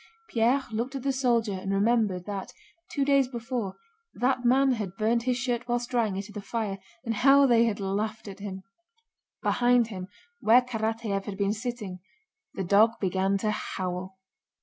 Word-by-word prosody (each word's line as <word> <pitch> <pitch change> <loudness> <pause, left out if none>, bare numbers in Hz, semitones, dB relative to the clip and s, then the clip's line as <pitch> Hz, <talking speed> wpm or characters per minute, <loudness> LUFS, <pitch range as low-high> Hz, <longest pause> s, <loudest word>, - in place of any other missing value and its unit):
Pierre 245 +4 +2
looked 235 +5 -3
at 265 - -4
the 275 -1 +1
soldier 240 -5 +1
and 190 +1 -4
remembered 200 -3 +1
that, 200 -2 -5 0.4
two 280 -2 0
days 275 -2 +4
before, 235 -5 -4 0.4
that 255 0 +1
man 265 +2 +4
had 205 -6 -3
burned 225 +2 +2
his 250 0 0
shirt 245 -1 -2
while 240 0 +1
drying 240 -4 -1
it 195 0 -4
at 210 - -13
the 205 - -5
fire 200 -2 -3 0.3
and 225 -2 -1
how 275 +2 +6
they 235 -3 +5
had 220 -3 -1
laughed 210 +3 -2
at 195 0 -8
him. 190 -2 -6 0.8
Behind 245 -1 +3
him, 185 -4 -6 0.3
where 235 +4 +5
Karatáev 225 -4 -2
had 200 -2 -5
been 200 0 +1
sitting, 220 -5 -5 0.6
the 195 - -2
dog 210 +5 +4
began 190 +1 +1
to 215 +2 0
howl. 185 -1 -4
225 Hz, 170 wpm, -27 LUFS, 195-245 Hz, 0.8 s, how